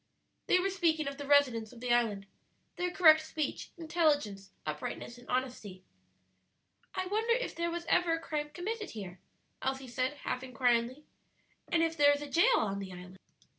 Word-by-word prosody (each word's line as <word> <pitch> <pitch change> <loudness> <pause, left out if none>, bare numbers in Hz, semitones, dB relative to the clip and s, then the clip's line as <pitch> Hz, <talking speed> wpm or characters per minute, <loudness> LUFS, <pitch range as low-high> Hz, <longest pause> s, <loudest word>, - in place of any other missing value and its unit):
They - - +5
were 390 +2 0
speaking 325 -5 +1
of 280 0 -5
the 285 - -6
residents 255 -7 +3
of 245 - -13
the 245 0 +1
island 215 -5 +1 0.5
their 360 0 -1
correct 315 -3 +6
speech, 310 -2 -3
intelligence, 295 - 0 0.2
uprightness, 155 +10 -5
and 245 - -17
honesty. 240 -7 -3 1.1
"I 370 - -1
wonder 440 +5 +1
if - - -2
there 340 0 -1
was 340 0 -4
ever 335 0 +3
a 330 - 0
crime 300 -2 -3
committed 415 +7 -4
here?" 185 -3 -7 0.4
Elsie 265 0 -2
said, 255 +3 -1
half 255 - -2
inquiringly. 250 +2 0 0.6
"And 330 -1 +2
if 325 0 0
there 290 -2 +6
is 285 - -3
a - - -6
jail 465 +9 +5
on 200 -2 -1
the 195 -1 -6
island?" 180 +1 -11
285 Hz, 170 wpm, -32 LUFS, 235-335 Hz, 1.1 s, correct